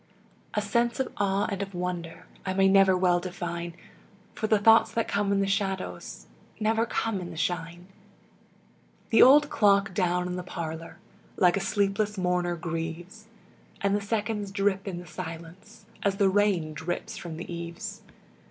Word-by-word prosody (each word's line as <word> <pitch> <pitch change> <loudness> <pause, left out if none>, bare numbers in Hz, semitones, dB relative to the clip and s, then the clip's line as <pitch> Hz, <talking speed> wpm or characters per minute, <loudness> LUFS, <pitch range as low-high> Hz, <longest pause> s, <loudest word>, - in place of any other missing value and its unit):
A 210 - +1
sense 235 +4 0
of 265 - -1
awe 200 0 +1
and 200 0 -3
of 195 -1 -5
wonder 175 -2 -4 0.2
I 185 -1 -2
may 195 0 +4
never 195 -1 +5
well 180 -1 +3
define, 175 -1 -5 0.6
For 215 - -2
the 215 - +4
thoughts 225 +2 +5
that 230 - 0
come 200 0 0
in 200 0 +2
the - - +2
shadows 195 -1 -3 0.3
Never 225 +1 +1
come 220 -3 -1
in 175 - -6
the 165 - -9
shine. 175 +1 -3 1.3
The 225 - +6
old 290 +3 +7
clock 200 -2 +3
down 180 0 +1
in 180 0 -3
the - - -3
parlor 165 -2 -6 0.4
Like 180 -2 +4
a - - 0
sleepless 200 +1 0
mourner 180 -1 0
grieves, 170 +5 -5 0.5
And 200 0 +1
the 205 - 0
seconds 210 0 -2
drip 195 0 0
in 185 -3 -3
the 175 - -8
silence 170 +4 -9 0.2
As 200 -1 +1
the 195 -1 +3
rain 190 -6 +1
drips 165 +3 -4
from 165 -2 -7
the 175 +1 -6
eaves. 170 0 -6
190 Hz, 165 wpm, -27 LUFS, 175-205 Hz, 1.3 s, old